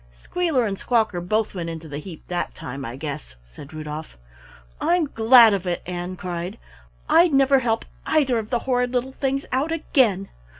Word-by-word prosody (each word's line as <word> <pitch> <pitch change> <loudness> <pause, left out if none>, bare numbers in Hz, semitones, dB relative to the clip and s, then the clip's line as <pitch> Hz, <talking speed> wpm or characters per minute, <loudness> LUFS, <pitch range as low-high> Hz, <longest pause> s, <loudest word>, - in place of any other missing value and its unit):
"Squealer 315 - 0
and 195 -2 -3
Squawker 220 -7 +1
both 215 +5 0
went 170 -3 -4
into 165 -1 -7
the 145 -1 -6
heap 165 0 -11
that 175 -1 -3
time, 135 +2 -7
I 120 -1 -6
guess," 135 - -6
said - - -13
Rudolf. 155 - -7 0.6
"I'm 350 -2 +2
glad 230 -3 +6
of 190 -2 -2
it!" 175 - -2
Ann 180 +1 -4
cried. 180 +3 -5 0.5
"I'd 340 -2 +5
never 270 0 +5
help 230 -3 -1 0.2
either 270 -7 +2
of 215 -1 -6
the 245 - +1
horrid 250 -1 +1
little 255 +1 -1
things 275 +1 -1
out 275 +5 0
again. 240 - +1
215 Hz, 175 wpm, -23 LUFS, 170-260 Hz, 0.6 s, glad